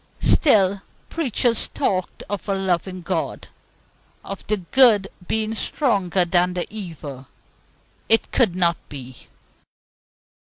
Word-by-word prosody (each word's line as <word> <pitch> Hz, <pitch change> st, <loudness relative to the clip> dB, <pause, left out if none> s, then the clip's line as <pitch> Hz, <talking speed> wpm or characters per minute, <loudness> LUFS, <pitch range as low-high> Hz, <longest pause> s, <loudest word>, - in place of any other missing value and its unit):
Still 200 Hz, -, +4 dB, 0.3 s
preachers 245 Hz, -6 st, +1 dB
talked 185 Hz, -2 st, -2 dB
of 205 Hz, +1 st, -5 dB
a 195 Hz, -, +1 dB
loving 185 Hz, -1 st, -2 dB
God, 170 Hz, -2 st, -3 dB, 0.8 s
of 195 Hz, -, -6 dB
the 215 Hz, -, +1 dB
good 210 Hz, +1 st, +4 dB, 0.2 s
being 220 Hz, 0 st, -1 dB
stronger 195 Hz, -, 0 dB
than 180 Hz, +1 st, +1 dB
the 175 Hz, -, -1 dB
evil. 150 Hz, -10 st, -8 dB, 0.8 s
It 225 Hz, -, +3 dB
could 220 Hz, -9 st, +2 dB
not 170 Hz, -2 st, +2 dB
be. 130 Hz, -3 st, -10 dB
190 Hz, 110 wpm, -22 LUFS, 175-215 Hz, 0.8 s, Still